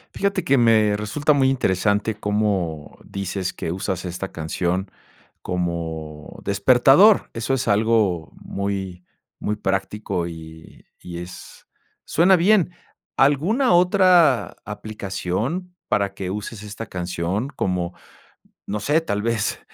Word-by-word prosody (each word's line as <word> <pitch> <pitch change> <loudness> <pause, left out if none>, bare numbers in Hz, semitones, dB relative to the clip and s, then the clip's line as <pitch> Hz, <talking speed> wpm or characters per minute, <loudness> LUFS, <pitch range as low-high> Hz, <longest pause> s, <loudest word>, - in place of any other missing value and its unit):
Fíjate 200 -3 0
que 140 - +4
me 110 -3 +4
resulta 125 +9 +1
muy 135 -2 +3
interesante 105 -3 +1
cómo 100 -7 -1
dices 95 -1 -4
que 80 - -4
usas 95 -1 -3
esta 90 +2 -5
canción 90 +4 -2 0.5
como 80 -4 -4
despertador, 130 - +5
eso 115 +3 -2
es 135 -1 -1
algo 105 -6 +2
muy 95 -2 -4 0.4
muy 105 0 -2
práctico 95 -2 -2
y 80 -1 -11 0.2
y 85 -1 -8
es 90 +1 -11 0.4
suena 180 +3 +4
bien, 185 0 +3 0.5
¿alguna 175 - +3
otra 175 - +4
aplicación 105 - -4
para 100 -1 +1
que 95 -2 -5
uses 105 +1 -6
esta 105 +2 -7
canción, 90 +6 -3
como, 90 -7 -2 0.7
no 105 - -2
sé, 150 +8 +2
tal 105 -9 -2
vez, 115 -3 -1
105 Hz, 115 wpm, -22 LUFS, 90-135 Hz, 0.7 s, despertador